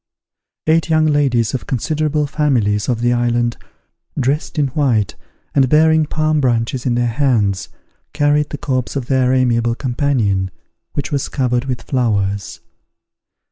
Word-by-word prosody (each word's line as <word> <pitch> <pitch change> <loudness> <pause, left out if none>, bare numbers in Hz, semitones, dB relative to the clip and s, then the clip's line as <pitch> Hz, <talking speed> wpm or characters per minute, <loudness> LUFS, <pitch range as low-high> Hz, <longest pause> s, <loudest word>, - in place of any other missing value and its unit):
Eight 160 +1 +2
young 155 -1 +3
ladies 135 -7 +1
of 130 - -4
considerable 150 +3 0
families 125 -9 0
of 120 -2 0
the 120 0 +2
island, 120 0 0 0.6
dressed 140 +5 -1
in 145 -2 +2
white, 125 -7 0 0.4
and 135 -3 +3
bearing 160 +1 +4
palm 155 0 0
branches 120 0 0
in 120 - +1
their 120 0 +1
hands, 115 -7 0 0.4
carried 150 0 +1
the 145 - -5
corpse 130 -3 -2
of 135 -3 -2
their 130 -1 +2
amiable 120 -2 +2
companion, 120 -8 0 0.4
which 145 - -3
was 140 -2 -1
covered 125 -1 0
with 130 -2 -4
flowers. 100 -8 -1
130 Hz, 140 wpm, -18 LUFS, 120-145 Hz, 0.6 s, bearing